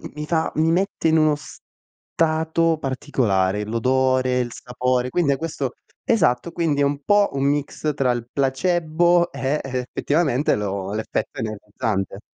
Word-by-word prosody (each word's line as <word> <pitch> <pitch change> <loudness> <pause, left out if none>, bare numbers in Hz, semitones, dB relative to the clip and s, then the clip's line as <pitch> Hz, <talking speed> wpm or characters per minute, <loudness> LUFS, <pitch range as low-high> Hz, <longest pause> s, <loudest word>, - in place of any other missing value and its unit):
mi 150 0 -4
fa 160 0 0
mi 160 +1 +2
mette 185 -1 +1
in 160 - +4
uno 155 -1 +4
stato 160 +2 -2
particolare, 105 -8 0
l'odore, 130 +2 +1
il 120 -1 -2
sapore, 125 0 -1
quindi 145 0 +2
a - - -3
questo 145 -5 -3 0.3
esatto, 170 - +2
quindi 160 -4 0
è - - +4
un 140 0 -1
po' 205 +5 +4
un 135 0 -1
mix 145 +1 -1
tra 135 -3 +1
il 120 -1 -3
placebo 170 +5 +2
e 140 +2 -1
effettivamente 135 +3 0
lo 100 -1 -3
l'effetto 110 +1 -3
energizzante. 105 -2 -3
140 Hz, 140 wpm, -22 LUFS, 125-160 Hz, 0.3 s, in